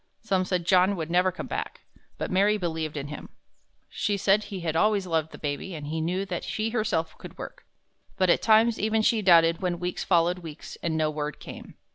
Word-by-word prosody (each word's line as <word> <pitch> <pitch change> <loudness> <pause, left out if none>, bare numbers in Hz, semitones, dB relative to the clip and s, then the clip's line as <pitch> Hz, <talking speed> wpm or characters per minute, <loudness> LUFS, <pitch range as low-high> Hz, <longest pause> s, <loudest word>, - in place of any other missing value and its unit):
Some 190 -4 +1
said 180 -2 -1
John 185 +2 +4
would 165 -2 -5
never 180 +1 +3
come 185 - -7
back. - - -5 0.4
But - - -4
Mary 200 +3 +3
believed 160 -4 -3
in 145 0 -5
him. 150 - -8 0.6
She 205 -2 -1
said 200 +2 +3
that - - -9
he 195 -3 -6
had 160 -2 -2
always 205 +2 +2
loved 160 -3 -1
the - - -10
baby 150 +5 -4
and 150 -2 -7
he 160 +2 -3
knew 180 +4 -1
that 180 -3 -4
she 220 +1 -2
herself 215 -8 -1
could - - -11
work. - - -9 0.5
But 185 -2 +4
at - - +2
times 225 +1 +4
even 220 +1 +1
she 220 0 +3
doubted 165 -3 +5
when 175 -2 -1
weeks 180 0 -3
followed 175 0 +2
weeks 160 -3 -9
and 160 -2 -1
no 155 -1 +1
word 150 -1 -4
came. - - -10
180 Hz, 215 wpm, -26 LUFS, 160-200 Hz, 0.6 s, doubted